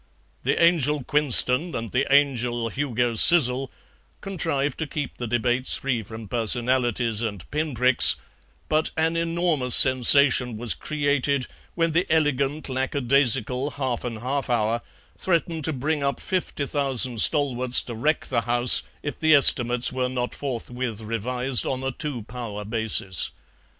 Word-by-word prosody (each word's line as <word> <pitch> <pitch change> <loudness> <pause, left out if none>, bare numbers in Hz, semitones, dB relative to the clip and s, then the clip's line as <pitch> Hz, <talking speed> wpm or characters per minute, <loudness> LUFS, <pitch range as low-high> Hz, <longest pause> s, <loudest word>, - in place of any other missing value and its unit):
The - - -2
Angel 150 -4 +1
Quinston 145 +3 +1
and 115 -2 -6
the 135 +2 -2
Angel 125 -5 0
Hugo 125 -2 -3
Sizzle 130 0 +4 0.5
contrived 150 -7 -3
to 160 - -4
keep 145 -2 -7
the 120 - -5
debates 120 +2 -1
free 130 -4 -3
from 110 +1 -11
personalities 120 0 -1
and 100 -6 -6
pinpricks, 130 -5 +5 0.5
but 155 +1 -1
an 160 +1 -1
enormous 165 -6 -1
sensation 130 -2 +4
was 120 +1 +1
created 145 -3 -2 0.3
when 165 -1 -1
the 170 +3 -1
elegant 150 -1 -1
lackadaisical 130 0 +1
Halfan 120 -4 -5
Halfour 120 -4 -2 0.4
threatened 165 -3 -2
to 160 - -1
bring 150 +2 -3
up 140 0 -3
fifty 180 -6 -4
thousand 130 -5 +2
stalwarts 130 -5 +3
to 120 - -9
wreck 150 +8 -2
the 120 -3 -2
House 120 +2 +6 0.2
if 145 - -7
the 155 -1 +3
Estimates 125 -3 +5
were 130 -1 -3
not 125 -1 -5
forthwith 125 -4 -6
revised 125 +3 -1
on 130 0 -5
a 135 - -3
Two 135 -4 -6
Power 110 -3 -8
basis. 110 -5 0
130 Hz, 135 wpm, -22 LUFS, 120-145 Hz, 0.5 s, House